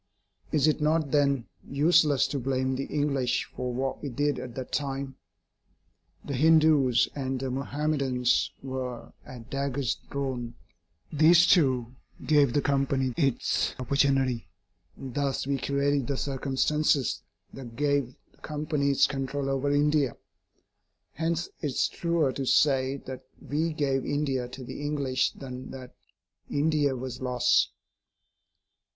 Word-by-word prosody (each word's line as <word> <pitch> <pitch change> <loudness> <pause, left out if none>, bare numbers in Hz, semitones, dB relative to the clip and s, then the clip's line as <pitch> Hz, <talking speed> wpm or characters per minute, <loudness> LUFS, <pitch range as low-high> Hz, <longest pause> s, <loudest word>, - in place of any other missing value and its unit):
Is 155 -1 +3
it 155 0 +1
not 155 -1 +1
then 140 -4 +2 0.2
useless 150 0 +4
to 140 - -2
blame 130 0 -1
the 135 +1 -3
English 140 -4 0
for 125 0 -3
what 130 +2 -3
we 145 - -4
did 145 +2 0
at 120 -2 -8
that 130 -1 -6
time? 135 -1 -3 1.1
The 140 - -4
Hindus 150 -4 +4
and 135 -2 -3
the 130 0 -3
Mahomedans 135 -2 0
were 130 -2 -5
at 120 -3 -11
daggers 140 -2 -1
drawn. 130 -4 -4 0.6
This, 160 +3 +6
too, 130 -9 +3 0.3
gave 145 -4 +4
the 145 - +1
Company 135 -2 +1
its 135 -6 0
opportunity; 130 -3 +1 0.5
and 130 -2 -8
thus 140 -1 -1
we 140 0 -1
created 140 0 0
the 140 -1 -1
circumstances 140 +1 0 0.3
that 120 -4 -9
gave 140 -2 0 0.2
the - - -29
Company 150 -2 -2
its 140 - +4
control 135 0 -2
over 135 +1 0
India. 145 -1 +2 1.0
Hence 165 +1 -1
it 150 - -1
is 135 - +1
truer 170 -5 0
to 135 0 -4
say 135 -1 +3
that 130 0 -7 0.2
we 160 +3 -1
gave 135 -4 0
India 135 -4 -1
to 125 +1 -9
the 125 - -7
English 140 -3 0
than 130 -1 -8
that 130 -2 -9 0.6
India 145 -2 +1
was 130 0 -6
lost. 125 -1 +2
135 Hz, 135 wpm, -27 LUFS, 130-145 Hz, 1.1 s, This